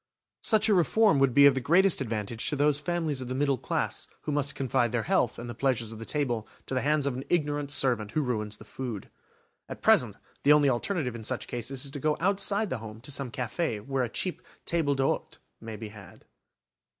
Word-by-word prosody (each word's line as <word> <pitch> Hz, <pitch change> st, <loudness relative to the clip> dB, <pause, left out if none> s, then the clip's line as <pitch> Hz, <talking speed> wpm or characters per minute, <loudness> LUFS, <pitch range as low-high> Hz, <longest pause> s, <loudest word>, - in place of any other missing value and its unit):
Such 220 Hz, -1 st, +3 dB
a 215 Hz, -, +4 dB
reform 195 Hz, -1 st, +4 dB
would 135 Hz, -1 st, +4 dB
be 140 Hz, +3 st, +7 dB
of 140 Hz, -, +8 dB
the 130 Hz, -, -2 dB
greatest 175 Hz, +5 st, +4 dB
advantage 115 Hz, -2 st, -2 dB
to -, -, -1 dB
those 145 Hz, 0 st, +2 dB
families 155 Hz, -3 st, -2 dB
of 130 Hz, -, -5 dB
the 130 Hz, -, -3 dB
middle 140 Hz, -2 st, +1 dB
class -, -, -2 dB
who 150 Hz, -, -4 dB
must 140 Hz, -1 st, 0 dB
confide 130 Hz, -3 st, +1 dB
their 115 Hz, -1 st, 0 dB
health 190 Hz, +1 st, +1 dB
and 120 Hz, -, -7 dB
the 120 Hz, -, -5 dB
pleasures 120 Hz, -2 st, 0 dB
of 110 Hz, -, -9 dB
the 115 Hz, -, -6 dB
table 120 Hz, -7 st, -1 dB, 0.2 s
to -, -, -6 dB
the 130 Hz, -, +1 dB
hands 150 Hz, 0 st, +1 dB
of 140 Hz, -, 0 dB
an 130 Hz, -, -5 dB
ignorant 145 Hz, -4 st, 0 dB
servant 125 Hz, -7 st, +1 dB
who 155 Hz, -, +1 dB
ruins 105 Hz, -4 st, -2 dB
the -, -, -13 dB
food. 120 Hz, -7 st, -6 dB, 0.6 s
At -, -, -8 dB
present, -, -, +4 dB, 0.3 s
the 145 Hz, -, +6 dB
only 145 Hz, -2 st, +5 dB
alternative 130 Hz, -, -1 dB
in 115 Hz, -, -7 dB
such 130 Hz, +3 st, -2 dB
cases 130 Hz, +3 st, -4 dB
is 140 Hz, -, -6 dB
to 145 Hz, -, -6 dB
go 150 Hz, +2 st, +1 dB
outside 200 Hz, +3 st, +1 dB
the -, -, -2 dB
home 110 Hz, 0 st, -9 dB
to 130 Hz, -, -8 dB
some 135 Hz, -1 st, -2 dB
café 125 Hz, -1 st, -2 dB
where 135 Hz, -1 st, 0 dB
a 120 Hz, -, -2 dB
cheap 180 Hz, +9 st, -3 dB, 0.2 s
table 160 Hz, -4 st, +1 dB
d'hôte 135 Hz, 0 st, -1 dB, 0.2 s
may 110 Hz, -1 st, -7 dB
be 110 Hz, 0 st, -7 dB
had. 100 Hz, -5 st, -14 dB
135 Hz, 220 wpm, -28 LUFS, 120-150 Hz, 0.6 s, of